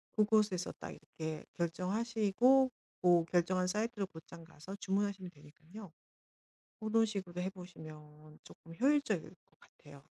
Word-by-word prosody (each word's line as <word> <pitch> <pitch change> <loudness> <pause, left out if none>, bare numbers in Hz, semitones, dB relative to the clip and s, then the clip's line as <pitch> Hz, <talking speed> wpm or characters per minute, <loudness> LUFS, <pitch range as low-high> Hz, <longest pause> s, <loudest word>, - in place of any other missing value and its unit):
그곳에서 210 -4 +3
딱 - - -6
이렇게 160 -1 -6
결정하시고 220 +8 +3 0.3
뭐 175 -2 +5
결정한 180 +2 +2
사이트로 210 +1 -1
곧장 165 -1 -12
가서 160 +4 -10
주문하시면 195 -1 -1
되니깐요. 160 +6 -13 0.9
고런 225 +1 +3
식으로 190 -4 -4
해 190 - -1
보시면 155 -4 -12
쪼끔 165 0 -13
효율적일 270 - +3
것 175 +2 -21
같아요. 140 -1 -16
185 Hz, 310 characters per minute, -35 LUFS, 165-210 Hz, 0.9 s, 뭐